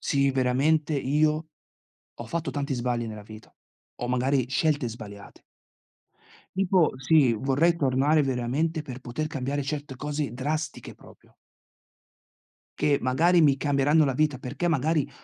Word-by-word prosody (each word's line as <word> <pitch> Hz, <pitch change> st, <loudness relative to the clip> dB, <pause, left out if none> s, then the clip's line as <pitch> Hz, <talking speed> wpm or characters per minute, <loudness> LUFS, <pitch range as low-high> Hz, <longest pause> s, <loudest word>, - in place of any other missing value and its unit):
Sì, 140 Hz, -1 st, +1 dB
veramente 135 Hz, +4 st, +1 dB
io, 150 Hz, +3 st, +1 dB, 0.7 s
ho -, -, -8 dB
fatto 165 Hz, -3 st, -3 dB
tanti 140 Hz, 0 st, -3 dB
sbagli 120 Hz, -1 st, -2 dB
nella 110 Hz, -1 st, -7 dB
vita, 110 Hz, +1 st, -14 dB, 0.4 s
o 120 Hz, -, -4 dB
magari 125 Hz, 0 st, +1 dB
scelte 140 Hz, -1 st, 0 dB
sbagliate. 105 Hz, -3 st, -11 dB, 1.1 s
Tipo, 185 Hz, -3 st, +2 dB
sì, 135 Hz, -2 st, +4 dB
vorrei 140 Hz, +9 st, +2 dB
tornare 145 Hz, +1 st, +2 dB
veramente 135 Hz, +5 st, -1 dB
per 130 Hz, -3 st, -8 dB
poter 130 Hz, +5 st, -4 dB
cambiare 140 Hz, -1 st, -3 dB
certe 145 Hz, -2 st, -5 dB
cose 150 Hz, +1 st, -3 dB
drastiche, 145 Hz, +4 st, -4 dB
proprio. -, -, -19 dB, 1.4 s
Che, 145 Hz, -1 st, +2 dB
magari 165 Hz, +8 st, +3 dB
mi 140 Hz, -3 st, +4 dB
cambieranno 145 Hz, +2 st, +2 dB
la 135 Hz, -, 0 dB
vita 150 Hz, 0 st, +1 dB
perché, 135 Hz, +7 st, -3 dB
magari, 155 Hz, -1 st, +1 dB
140 Hz, 130 wpm, -26 LUFS, 130-155 Hz, 1.4 s, sì